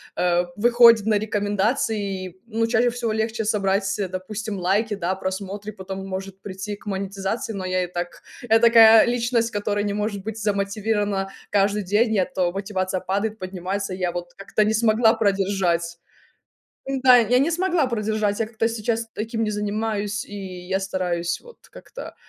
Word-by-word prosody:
а, 175 0 +1
выходит 235 -1 +6
на 215 -2 +3
рекомендации. 205 -1 -1
И, 185 +1 -16
ну, 225 0 0
чаще 240 +1 +3
всего 235 -2 -2
легче 220 +1 -1
собрать, 200 -2 0
э, 195 - 0
допустим, 200 +2 -5
лайки, 205 +5 +1
да, 185 0 -2
просмотры, 195 +2 -5
потом 190 -1 -7
может 195 0 -6
прийти 195 +1 -5
к 205 - -20
монетизации. 195 +2 -3
Но 190 -2 -5
я 185 0 0
и 180 - -3
так, 175 0 -5 0.3
я 225 +1 +6
такая 225 -1 +8
личность, 235 -1 +1
которая 205 0 -1
не 205 - -1
может 210 -1 -2
быть 220 0 -5
замотивирована 200 -1 -1 0.2
каждый 205 +1 +1
день, 215 +4 +2
я 185 - +2
то 180 -2 -1
мотивация 190 -1 -2
падает, 200 +4 -2
поднимается. 185 +1 -4
Я 180 -2 -1
вот 175 0 -6
как-то 200 +2 0
не 220 - +1
смогла 220 0 +4
продержать. 195 -5 0 0.9
М-да. 260 -2 +5
Я 240 +1 +3
не 295 +6 +2
смогла 350 -3 +1
продержать, 215 -3 -1
я 225 - 0
как-то 225 0 -1
сейчас 230 0 -2
таким 225 +1 -3
не 215 - -1
занимаюсь, 210 0 -2
и - - -12 0.3
я 190 +1 0
стараюсь 180 -3 -2
вот 480 -1 -15
как-то - - -10
205 Hz, 165 wpm, -23 LUFS, 190-225 Hz, 0.9 s, такая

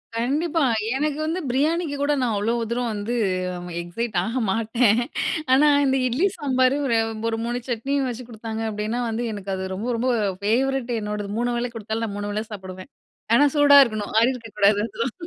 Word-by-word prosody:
கண்டிப்பா 295 +7 0 0.3
எனக்கு 295 +1 -1
வந்து 325 +4 -1
பிரியாணிக்கு 300 +4 0
கூட 290 +1 +2
நான் 240 -3 +1
அவ்ளோ 210 +3 0 0.2
தூரம் 240 0 -1
வந்து, 210 +3 -3 0.7
எக்ஸைட் 195 +5 -4
ஆக 230 +6 -2
மாட்டேன். 225 +2 +2 0.5
ஆனா 290 +3 +5 0.2
இந்த 265 0 +2
இட்லி 265 +11 +2
சாம்பாரு 260 -3 +2 0.5
ஒரு, 225 - -2
ஒரு 240 +1 -2
சட்னியும் 265 +4 -1
வெச்சு 245 +1 -6
குடுத்தாங்க, 225 -1 -6
அப்டின்னா 215 +3 -2
வந்து 230 +2 -2
எனக்கு 200 -1 -6
அது 190 0 -4
ரொம்ப 220 +6 -4
ரொம்ப 250 +2 +1 0.3
ஃபேவரெட் 250 +4 0
என்னோடது 210 -1 -4
3 240 0 0
வேள 240 0 -2
கொடுத்தாலும், 225 +1 -3
நான் 200 -2 -5
3 205 0 -3
வேள 210 +1 -2
சாப்பிடுவேன். 185 +3 -9 0.4
ஆனா 285 - +6
சூடா 285 -1 +7
இருக்கணும். 215 -4 -4
ஆறி 235 +3 +4
இருக்க 235 -3 -9
கூடாது 205 0 +4
அதெல்லாம். 230 +2 -3
235 Hz, 170 wpm, -23 LUFS, 215-265 Hz, 0.7 s, சூடா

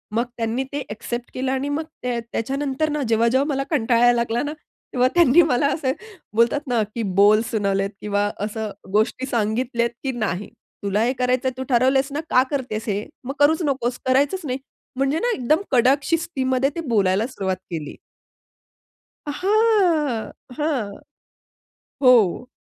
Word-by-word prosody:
मग 235 - +2
त्यांनी 230 +3 -1
ते 285 - -2
ॲक्सेप्ट 240 +3 -5
केलं 260 +1 -2
आणि 270 +2 -1
मग 305 +2 -1 0.2
त्या 245 -1 -1
त्याच्यानंतर 275 +5 -1
ना 300 0 -1
जेव्हा-जेव्हा 235 +5 +3
मला 275 0 0
कंटाळा 235 -6 +2
यायला 245 0 +6
लागला 235 +1 0
ना, 295 - -3 0.4
तेव्हा 250 0 +3
त्यांनी 340 -2 +6
मला 285 -3 +2
असे 265 -4 -1 0.4
बोलतात 240 +6 +2
ना 240 -3 +1
की 230 - -2 0.2
बोल 210 +2 +6
सुनावलेत 195 -2 0
किंवा 205 0 0 0.2
असं 215 -1 -4 0.2
गोष्टी 230 +4 +1
सांगितल्यात, 235 +1 0
"की 270 - -1
नाही. 205 -3 -2 0.3
तुला 200 +2 +1
हे 245 +2 +1
करायचंय 255 +1 +1
तू 260 - -3
ठरवलेस 265 +3 +3
ना, 290 - -2
का 255 -4 +5
करतेस 245 -6 -2
हे? 205 +1 -1 0.2
मग 270 +2 -4
करूच 310 +4 +4
नकोस 255 -3 -1
करायचंच 280 +8 +2
नाही. 255 -1 -2 0.4
म्हणजे 275 +4 +1
ना, 485 - 0
एकदम 305 +8 +1
कडक 265 +3 +4
शिस्तीमध्ये 270 -5 0
ते 335 - -2
बोलायला 200 -1 +2
सुरुवात 190 -7 -3
केली. 155 -3 -5 1.3
हां, 360 - +2 0.3
हां. 290 -9 -1 1.1
हो. 245 -2 +4
255 Hz, 150 wpm, -22 LUFS, 225-280 Hz, 1.3 s, यायला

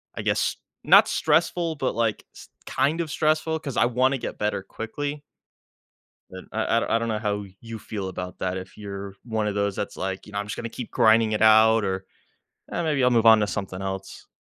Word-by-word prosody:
I - - -4
guess, - - 0 0.3
not - - +7
stressful, 170 -2 +1
but, 130 -5 -1
like, 115 -3 -1
s - - -13 0.2
kind 155 +4 0
of 160 - -4
stressful 155 +1 +1
'cause 140 -5 -6
I - - +5
wanna 130 +3 +2
get - - -6
better 105 -1 -1
quickly 145 +8 -5 1.1
and 95 0 -10
I 110 - -1
I 115 0 +1
I - - +3
don't 115 - -2
know 110 -1 -1
how 105 -1 -2 0.2
you 115 -1 -8
feel 100 -3 -5
about 90 0 -7
that 95 0 -2
if 95 +2 -9
you're 100 -1 -7
one 110 -3 -2
of 105 - -2
those 100 -1 0
that's 100 - -4
like, 95 0 -4
you 105 - -13
know, 100 - -1
"I'm 105 - -3
just 105 - -4
gonna 115 - -5
keep 120 0 -7
grinding 110 0 +4
it 105 - -1
out," 110 0 +6
or 95 -1 -2 0.7
"Eh, 170 - -1
maybe 150 -5 +1
I'll 125 - +4
move 115 -1 +3
on 110 -1 +8
to 105 - +2
something 95 -3 -4
else." 95 0 -6
110 Hz, 215 wpm, -25 LUFS, 100-125 Hz, 1.1 s, on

